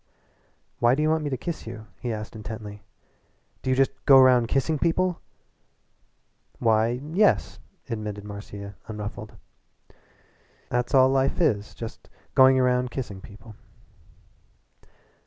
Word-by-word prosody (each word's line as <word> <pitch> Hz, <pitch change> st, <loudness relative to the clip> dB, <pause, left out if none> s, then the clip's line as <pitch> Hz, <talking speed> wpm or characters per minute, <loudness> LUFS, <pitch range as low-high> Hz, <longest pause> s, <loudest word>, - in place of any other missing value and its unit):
"Why 120 Hz, +2 st, +4 dB
do 150 Hz, -, 0 dB
you 155 Hz, -, +2 dB
want 160 Hz, -1 st, +1 dB
me 145 Hz, -, -2 dB
to 130 Hz, -, -2 dB
kiss 165 Hz, -1 st, -6 dB
you?" 115 Hz, -1 st, -8 dB
he 120 Hz, -, -3 dB
asked 110 Hz, -1 st, -6 dB
intently, 105 Hz, -1 st, -8 dB, 0.8 s
"Do -, -, -3 dB
you 130 Hz, -, +3 dB
just 135 Hz, 0 st, +3 dB, 0.2 s
go 135 Hz, -1 st, +9 dB
round 125 Hz, -2 st, +5 dB
kissing 140 Hz, +5 st, 0 dB
people?" 175 Hz, +2 st, 0 dB, 1.4 s
"Why, 115 Hz, +1 st, +2 dB
yes," 210 Hz, +3 st, +2 dB, 0.3 s
admitted 105 Hz, -4 st, -5 dB
Marcia, 100 Hz, -1 st, -8 dB
unruffled. 105 Hz, -1 st, -7 dB, 1.4 s
"'At's 125 Hz, +3 st, 0 dB
all 130 Hz, 0 st, +6 dB
life 135 Hz, +3 st, +1 dB
is. 105 Hz, -, 0 dB
Just 115 Hz, -1 st, -9 dB, 0.2 s
going 130 Hz, 0 st, +6 dB
round 125 Hz, 0 st, +2 dB
kissing 110 Hz, -7 st, -6 dB
people." 105 Hz, +3 st, -13 dB
125 Hz, 125 wpm, -25 LUFS, 110-135 Hz, 1.4 s, go